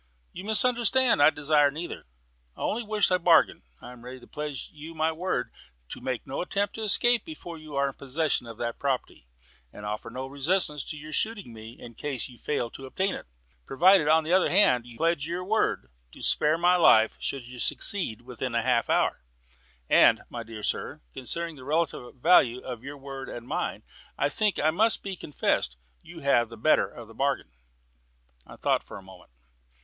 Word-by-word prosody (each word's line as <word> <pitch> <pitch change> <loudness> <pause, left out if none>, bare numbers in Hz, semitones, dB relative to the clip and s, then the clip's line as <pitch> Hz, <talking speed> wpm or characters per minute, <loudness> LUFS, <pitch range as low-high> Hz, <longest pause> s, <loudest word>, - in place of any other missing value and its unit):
"You 185 - -8
misunderstand. 240 - +3
I 145 - +8
desire 150 -1 +3
neither; 160 - -7 0.5
I - - -10
only 230 - -1
wish 215 -3 +1
a 180 - +3
bargain. 170 -2 +4 0.2
I 125 - -9
am 120 -1 -14
ready 130 +1 -9
to - - -15
pledge 150 -3 -5
you 155 +2 -10
my 160 +1 +1
word 180 +4 -2 0.4
to - - -7
make 130 -2 -3
no 135 - -4
attempt 200 +3 -1
to 225 - -6
escape 235 +3 +3
before 175 - -9
you 155 -2 -10
are 140 0 +2
in 135 - -4
possession 140 -2 -1
of 115 -1 -9
that 120 0 -4
property, 130 - -3 0.4
and 105 - -11
to - - -5
offer 105 0 -4
no 130 +3 -5
resistance 150 +2 +1
to 155 - -4
your 155 +1 -9
shooting 210 - -2
me 110 +1 -10
in 120 - -10
case 135 0 -4
you 120 -2 -15
fail 125 -6 -2
to 135 - -9
obtain 190 +8 -1
it, - - -8 0.4
provided 175 +3 +5
on 160 +1 +5
the 160 +3 -1
other 190 - +4
hand 125 - +4
you 120 -1 -12
pledge 165 -2 +1
your 175 +2 -3
word 180 - 0 0.2
to - - -11
spare 155 +2 +3
my 175 +2 +4
life 110 -10 +5
should 135 -3 -4
you 125 0 -11
succeed 120 - 0
within 125 0 -5
half 115 - +1
an - - +4
hour. - - +1 0.7
And, - - +5
my 120 - -5
dear 115 -2 -9
sir, - - -2
considering 165 +5 -4
the 130 - -11
relative 145 -4 -2
value 125 -2 +4
of 125 -2 -7
your 140 +1 -8
word 135 -1 -8
and 120 0 -8
mine, - - -3 0.3
I - - +1
think 210 +5 0
it 155 +2 +2
must 215 +7 +2
be 195 -1 -4
confessed 95 - -1 0.2
you 165 -1 -12
have 120 -5 +3
the 115 - -10
better 135 +8 +3
of 120 -2 -11
the 115 - -14
bargain." 135 - -1 1.0
I - - -11
thought - - 0
for - - -10
a 100 - -12
moment. 95 -2 -15
145 Hz, 200 wpm, -27 LUFS, 125-175 Hz, 1.0 s, I